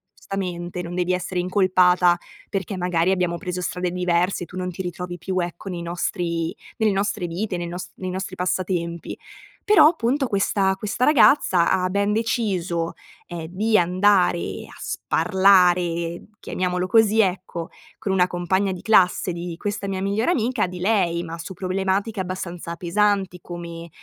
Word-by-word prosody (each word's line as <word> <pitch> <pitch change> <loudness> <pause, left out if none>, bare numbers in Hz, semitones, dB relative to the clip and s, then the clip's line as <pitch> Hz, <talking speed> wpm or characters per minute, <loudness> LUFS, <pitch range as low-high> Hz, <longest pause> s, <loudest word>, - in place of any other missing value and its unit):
giustamente, 180 -2 -4
non 175 0 -6
devi 180 0 0
essere 180 0 -2
incolpata 180 -1 +4 0.3
perché 195 0 -3
magari 180 -1 +1
abbiamo 180 -2 +1
preso 180 -2 -4
strade 180 0 -2
diverse, 180 0 0
tu 180 - -10
non 180 0 -2
ti 180 +1 -5
ritrovi 175 0 -5
più, 185 +2 -2
ecco, 175 +2 -4
nei 175 -2 -4
nostri 170 -1 -2 0.2
nelle 220 -1 +2
nostre 195 -1 -1
vite, 180 +3 -3
nei 175 - -3
nos 175 +2 -6
nei 185 -1 -5
nostri 190 0 -4
passatempi. 180 -2 -2 0.5
Però 415 -7 +7
appunto 270 -3 +1
questa 195 -2 +1
questa 210 +5 -1
ragazza 245 - +5
ha 185 -1 +2
ben 200 +2 +1
deciso, 195 -7 -1 0.3
ehm, 170 -2 -6
di 215 +5 +1
andare 180 0 +2
a - - -14
sparlare, 180 -3 +2 0.2
chiamiamolo 180 0 -1
così 220 +2 +4
ecco, 185 -3 -2 0.3
con 195 - -3
una 180 -1 +3
compagna 185 +2 0
di 180 - -8
classe 185 -4 +3
di 170 0 -5
questa 205 +1 -3
mia 190 -1 -3
migliore 205 - +1
amica, 245 - +1
di 180 0 -8
lei, 180 -4 +1
ma 165 0 -6
su 165 +3 -7
problematiche 195 +3 -1
abbastanza 180 -2 -5
pesanti, 190 +1 0
come, 170 -1 -8
185 Hz, 150 wpm, -23 LUFS, 175-195 Hz, 0.5 s, Però